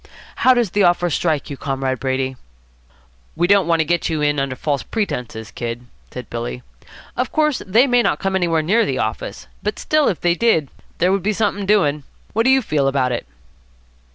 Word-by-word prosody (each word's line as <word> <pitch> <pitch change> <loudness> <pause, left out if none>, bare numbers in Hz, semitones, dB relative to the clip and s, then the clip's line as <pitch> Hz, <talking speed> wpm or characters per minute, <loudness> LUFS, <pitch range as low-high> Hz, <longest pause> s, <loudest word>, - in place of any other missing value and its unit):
How 255 0 +5
does 235 -7 +1
the 205 - +1
offer 175 -1 +3
strike 150 -2 -1
you, 140 - -5
Comrade 135 -2 -2
Brady?" 130 0 -1 1.0
"We 170 - +2
don't 195 -2 +4
want 165 -1 +3
to - - 0
get 175 +2 0
you 160 -2 -1
in 145 -1 +1
under 135 -1 -2
false 140 +1 -1
pretences, 120 - -4
Kid," 120 +3 -5 0.2
said - - -8
Billy. 60 +1 -5 0.5
"Of 250 - -2
course, 300 -3 +1
they 225 +7 +5
may 245 -2 +3
not - - +1
come 195 -1 -2
anywhere 170 -4 +1
near 215 +8 +3
the - - -1
office. - - -4 0.2
But - - -2
still, 310 -1 +2
if 185 - 0
they 175 -1 +2
did, 175 - +2 0.3
there 180 +2 +2
would 195 0 +1
be 210 +4 0
something 205 -2 -1
doing. 150 -8 +2 0.3
What 225 +2 +1
do - - +5
you 265 -1 +4
feel 150 -8 +1
about 135 -2 +1
it?" 120 - -3
170 Hz, 200 wpm, -20 LUFS, 135-210 Hz, 1.0 s, How